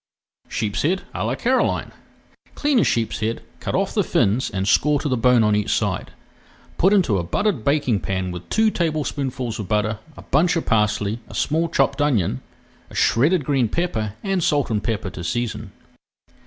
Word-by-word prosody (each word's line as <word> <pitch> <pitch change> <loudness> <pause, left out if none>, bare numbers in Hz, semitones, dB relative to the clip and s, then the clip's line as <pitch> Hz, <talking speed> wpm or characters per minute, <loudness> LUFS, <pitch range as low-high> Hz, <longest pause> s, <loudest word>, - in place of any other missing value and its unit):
SHEEPSHEAD 145 - -1
À 90 - -3
LA 115 +4 -1
CAROLINE 255 - 0 0.6
Clean 290 -4 +2
a - - +4
sheepshead, 115 0 -1 0.2
cut - - -3
off - - 0
the - - +2
fins 110 +7 +1
and 95 0 -2
score 145 +6 +3
to - - -3
the 130 - +1
bone 125 0 +4
on 105 -1 +3
each 105 -1 -1
side. - - -1 0.7
Put 190 - +4
into 175 - +3
a - - -2
buttered 150 - -1
baking 140 -6 +1
pan 95 +2 -2
with 90 0 -8
two 220 0 +3
tablespoonfuls 140 - -2
of 105 - -4
butter, 105 +2 0 0.2
a - - -10
bunch 165 +6 +2
of 165 - -1
parsley, 105 0 +1
a - - -9
small 165 +3 0
chopped - - +1
onion, 105 - +1 0.5
a - - -13
shredded 150 +6 +3
green 135 -6 +1
pepper, 110 - -2
and 195 -3 0
salt 145 -6 +1
and 105 -1 0
pepper 105 -5 -2
to 85 - -7
season. 110 0 -3
120 Hz, 175 wpm, -22 LUFS, 105-155 Hz, 0.7 s, a